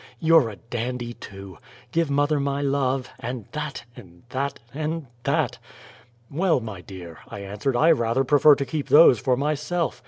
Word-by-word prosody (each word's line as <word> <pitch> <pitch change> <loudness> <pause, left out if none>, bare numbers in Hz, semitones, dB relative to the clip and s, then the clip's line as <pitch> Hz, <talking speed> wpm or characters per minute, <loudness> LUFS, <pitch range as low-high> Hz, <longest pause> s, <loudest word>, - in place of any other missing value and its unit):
YOU'RE 160 -6 +5
A 105 - -8
DANDY 120 +2 -5
TOO! 95 -6 -11 0.3
Give 165 -2 +1
mother 145 +1 +2
my 140 0 -1
love 135 -2 0
and 120 -3 -5
THAT 150 -4 -5
and 90 -7 -15
THAT 140 +2 -3
and 155 +1 -3 0.2
THAT!" - - 0 0.7
"Well, 165 +1 +2
my 110 -6 -7
dear," 90 -3 -10
I 100 - -7
answered, 105 +6 -3
"I 160 +7 +5
rather 120 -2 +2
prefer 145 +2 +6
to 140 - -3
keep 145 +2 -4
THOSE 145 -6 +7
for 125 +2 +1
myself. 150 +4 -1
135 Hz, 160 wpm, -24 LUFS, 115-150 Hz, 0.7 s, THOSE